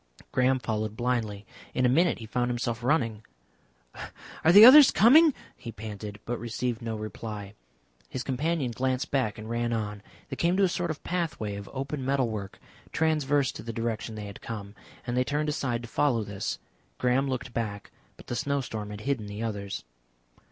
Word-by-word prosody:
Graham 130 +1 +3
followed 110 -3 -3
blindly. 115 -5 -1 0.3
In 130 - +2
a - - +6
minute 165 +6 +3
he 115 - -8
found 120 +2 -1
himself 120 -1 -2
running. 115 -6 +1 1.2
"Are 160 - +6
the 205 +5 +11
others 275 +2 +10
coming?" 300 +9 +7 0.2
he 115 - -8
panted, 105 -1 -7
but 120 0 -3
received 120 +1 -3
no 115 -1 -3
reply. 105 -1 -6 0.6
His 130 - -4
companion 140 0 -1
glanced 130 +3 -1
back 130 -7 0
and 110 0 -8
ran 120 +1 -1
on. 105 -2 -3 0.3
They - - -5
came 175 +2 +2
to 200 - +4
a - - +5
sort 175 -1 -2
of 155 - -5
pathway 160 - -2
of 100 0 -8
open 135 +1 -4
metal 135 -2 +1
work, 100 -3 -6 0.3
transverse 145 -4 +1
to - - -9
the 115 - -5
direction 115 -1 -3
they 105 -1 -6
had 100 0 -9
come, 100 -3 -6 0.3
and 120 0 -2
they 125 - +3
turned 150 +3 -1
aside 125 -5 -2
to - - -7
follow 125 -3 +1
this. 100 -2 -4 0.4
Graham 130 +2 +1
looked 125 -1 -4
back, 105 -3 -4 0.3
but - - -14
the 120 - -4
snowstorm 120 -7 -2
had 105 0 -7
hidden 125 -4 -2
the 105 +2 -5
others. 100 -3 -4
120 Hz, 180 wpm, -28 LUFS, 110-140 Hz, 1.2 s, the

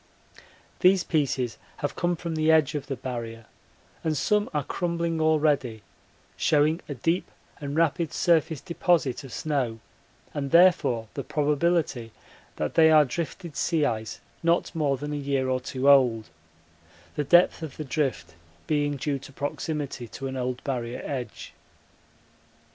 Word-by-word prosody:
These 185 0 +5
pieces 135 -6 -1 0.2
have 145 - -3
come 175 0 0
from 170 0 -5
the 155 0 +3
edge 155 -2 +4
of 145 -2 -4
the 135 - -3
Barrier 115 -2 -6 0.6
and 155 -2 0
some 205 +10 +1
are 150 -1 -1
crumbling 170 +1 -2
already, 150 -8 +1 0.5
showing 155 +2 +2
a 145 - -3
deep 165 +9 -1 0.3
and 145 0 -5
rapid 165 0 +1
surface 160 -4 +2
deposit 170 -7 0
of 135 - -10
snow 130 -7 -2 0.5
and 140 -2 -3
therefore 170 -9 +4
the - - -4
probability 150 -5 0 0.4
that 75 - -2
they 160 -1 +6
are 155 -1 +6
drifted 165 +3 -5
sea 160 -4 +1
ice 110 -2 -3 0.2
not 170 +1 +1
more 145 -5 0
than 145 +3 -5
a - - -2
year 140 -2 -1
or 130 0 +1
two 130 +1 -2
old, 120 -8 +4 0.8
the 150 - 0
depth 175 +4 +4
of 160 -4 -7
the 155 - -5
drift 135 - -2 0.3
being 145 -1 0
due 140 0 -2
to 140 - -12
proximity 145 -2 -4
to 135 - -8
an 135 0 -4
old 125 0 -3
Barrier 125 -3 -3
edge. 130 -4 -5
145 Hz, 150 wpm, -26 LUFS, 130-160 Hz, 0.8 s, they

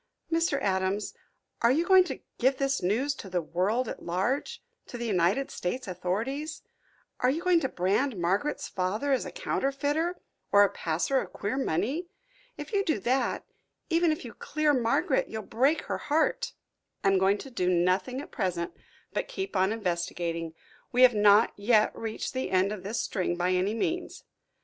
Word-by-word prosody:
"Mr. 330 -4 +2
Adams, 190 +1 0 0.5
are 235 - +5
you 320 +6 +2
going 375 0 +7
to 290 -7 -6 0.2
give 260 +2 +3
this 275 0 0
news 230 +11 +1
to 200 - -9
the 180 -1 0
world 190 +9 0
at - - -6
large 245 - -2 0.2
to 245 - -7
the 235 - -4
United 200 +6 +1
States 250 +7 -3
authorities 225 - -3 0.6
are 250 - +3
you 315 +6 -1
going 360 -2 +4
to 265 -5 -1
brand 205 +7 0
Margaret's 195 +12 0
father 205 +10 -1
as 265 - +1
a - - -7
counterfeiter, 305 - -1 0.3
or 205 0 +7
a 200 - +2
passer 175 +10 0
of - - -6
queer 205 +4 -3
money? 265 - -1 0.5
If - - -8
you 400 -1 +2
do 315 - +1
that, 255 +5 0 0.5
even 335 0 +4
if 310 - -3
you 235 - -8
clear 305 -1 0
Margaret, 255 - +1
you'll 220 -1 -5
break 275 +10 +1
her - - -3
heart." 310 +2 0 0.5
"I 195 - +4
am 195 -1 +3
going 195 +2 +3
to 270 - -9
do 180 -6 0
nothing 185 +9 +1
at - - -11
present 175 -3 -2 0.4
but - - -2
keep 390 - -5
on 190 +1 +3
investigating. 170 -5 -2 0.4
We 250 +1 +4
have 250 -1 +8
not 210 +1 +5
yet 215 +1 +3
reached 225 +3 -4
the 260 0 -2
end 190 +2 +2
of 210 -3 -5
this 205 +5 -3
string 180 -3 -1
by 180 +1 0
any 185 +4 +1
means. 345 +10 -2
225 Hz, 180 wpm, -28 LUFS, 185-280 Hz, 0.6 s, have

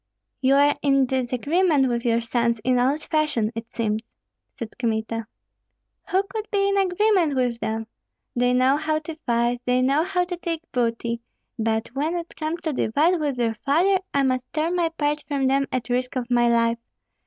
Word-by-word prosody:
"You 265 +1 +4
are 285 +1 +4
in 275 -2 +3
disagreement 265 +5 +1
with 235 -1 -1
your 235 0 +2
sons 235 0 0
in 250 0 +2
old 275 +5 +1
fashion, 300 -9 0
it 230 0 -7
seems?" 220 -2 -1 0.6
said 230 -2 -7
Kmita. 225 -1 -2 0.8
"Who 380 +1 +2
could 430 +2 -6
be 395 -2 +1
in 400 - +1
agreement 380 -4 +2
with 245 -2 0
them? 225 0 -2 0.5
They 245 0 +2
know 255 +3 +3
how 310 0 0
to 310 +1 -6
fight, 240 +1 +1
they 250 0 +2
know 275 +4 +3
how 360 0 0
to 355 0 -5
take 335 -2 -4
booty; 235 -1 -1 0.4
but 220 0 0
when 295 +7 -2
it 340 -1 -5
comes 320 +2 -3
to 315 -3 -2
divide 310 +10 +2
with 290 -3 -1
their 230 -2 +1
father, 360 +7 +3
I 280 - +2
must 255 -1 -1
tear 320 +2 0
my 345 -2 +1
part 300 -2 -1
from 280 -2 0
them 275 +1 +2
at 255 -2 -2
risk 250 +1 -1
of 250 -1 -3
my 240 -1 +4
life. 230 0 +2
265 Hz, 185 wpm, -24 LUFS, 235-315 Hz, 0.8 s, You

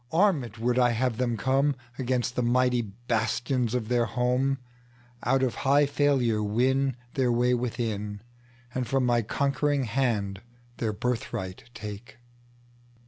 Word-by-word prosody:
Armed 160 - +2
would 120 +2 +1
I 125 -1 +5
have 120 -1 0
them 120 -2 0
comeAgainst 130 0 0
the 125 - 0
mighty 125 0 +3
bastions 120 +3 -1
of 115 -3 -1
their 120 0 +2
home; 125 +2 +1 0.6
Out 135 +3 +2
of 125 -3 +1
high 140 +2 +4
failure 140 -6 +2
winTheir 125 +3 0
way 120 +1 +3
within, 110 -4 -2 0.5
And 130 -2 -2
from 135 -2 +1
my 120 -1 +3
conquering 140 +4 0
hand 110 -5 -1 0.4
their 110 -2 -1
birthright 105 -5 -3
take. 105 +4 -8
125 Hz, 125 wpm, -27 LUFS, 115-130 Hz, 0.6 s, I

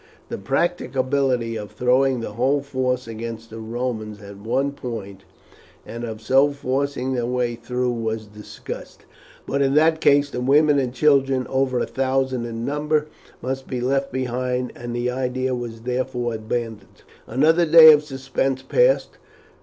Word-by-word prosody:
The - - -5
practicability 130 - 0
of 105 -2 -6
throwing 125 0 +2
the 115 - -5
whole 135 +6 +1
force 130 -2 -2
against 115 0 -7
the 115 - -8
Romans 110 -2 -4
at 100 -1 -11
one 130 +7 -1
point, 105 -8 -7 0.6
and 120 +1 -7
of 110 -2 -6
so 135 +5 +4
forcing 135 -1 -2
their 120 -2 -1
way 125 -1 0
through 125 +2 -2
was 110 -2 -3
discussed; 105 0 -10 0.4
but 140 - -1
in 135 0 +2
that 160 +1 +4
case 145 0 +4
the 125 - -3
women 145 +3 +4
and 130 -3 -1
children, 135 -1 +2
over 130 -1 +1
a - - 0
thousand 130 -1 -1
in 115 0 -5
number, 150 +1 0 0.3
must 130 +1 -4
be 125 - -3
left 135 +2 0
behind, 125 0 -2
and 120 0 -6
the 120 +1 -1
idea 130 0 -1
was 120 -2 -5
therefore 125 -1 -2
abandoned. 110 -2 -5 0.2
Another 160 +5 +3
day 160 0 +10
of 150 0 +2
suspense 135 -1 -2
passed. - - +2
125 Hz, 155 wpm, -22 LUFS, 115-135 Hz, 0.6 s, day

